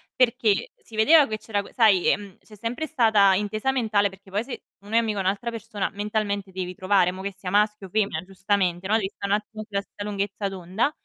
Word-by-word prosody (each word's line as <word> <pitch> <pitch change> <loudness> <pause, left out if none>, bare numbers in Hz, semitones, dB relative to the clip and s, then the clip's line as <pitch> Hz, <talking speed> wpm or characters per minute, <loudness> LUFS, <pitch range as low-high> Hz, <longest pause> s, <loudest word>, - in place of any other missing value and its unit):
perché 235 -4 +2
si 225 - -15
vedeva 290 +7 +6
che 215 -1 -3
c'era 205 -2 -2
sai, 210 -7 +4
ehm, 200 -2 -2
c'è 215 - -16
sempre 240 +9 -3
stata 220 -9 +4
intesa 215 +6 0
mentale, 215 -6 +2
perché 190 0 -17
poi 205 +3 0
se 255 0 -8 0.2
uno 205 +3 -6
è - - +6
amico 220 -3 +1
a - - +1
un'altra 200 +5 -1
persona, 220 -3 -4
mentalmente 205 -1 -2
devi 185 -1 -4
trovare, 185 -1 +2
mo' 185 +1 -8
che 200 +1 -3
sia 180 -2 -5
maschio 210 -1 +2
o - - -20
femmina, 200 -7 0
giustamente, 190 -1 -1
no, 215 - +3
devi 195 -3 0
sta' 200 - -5
un 200 - +1
attimo 215 +1 -3
sulla 200 -1 -1
stessa 205 0 -9
lunghezza 200 0 -2
d'onda. 190 - -1
205 Hz, 215 wpm, -25 LUFS, 195-220 Hz, 0.2 s, vedeva